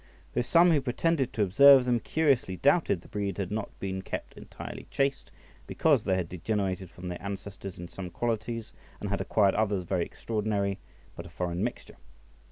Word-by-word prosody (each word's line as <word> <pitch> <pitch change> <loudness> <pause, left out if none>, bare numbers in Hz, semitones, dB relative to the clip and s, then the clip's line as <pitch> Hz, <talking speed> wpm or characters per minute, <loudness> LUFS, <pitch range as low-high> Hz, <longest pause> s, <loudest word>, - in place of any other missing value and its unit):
Though - - +1
some 170 +7 +5
who 150 -3 +3
pretended 135 +1 0
to 110 - +1
observe 135 +7 +7
them 120 -1 +2
curiously 135 -8 +1
doubted 140 - +3
the - - -16
breed 100 -2 -3
had 100 -2 -3
not 105 -1 -2
been 95 -1 -3
kept - - -6
entirely - - -9
chaste, 135 -1 -1 0.4
because 145 -8 +2
they 95 - +1
had 90 -2 -1
degenerated 95 0 -2
from 90 +1 -9
their 90 -1 -5
ancestors 100 -1 -7
in 85 - -7
some 90 +1 -7
qualities, 115 +3 -3 0.3
and - - -4
had - - 0
acquired 100 -3 +3
others 105 -4 0
very 90 0 0
extraordinary, 105 -3 -2 0.4
but 85 - -8
a - - -12
foreign 85 +1 -3
mixture. - - -5
100 Hz, 175 wpm, -29 LUFS, 95-125 Hz, 0.4 s, observe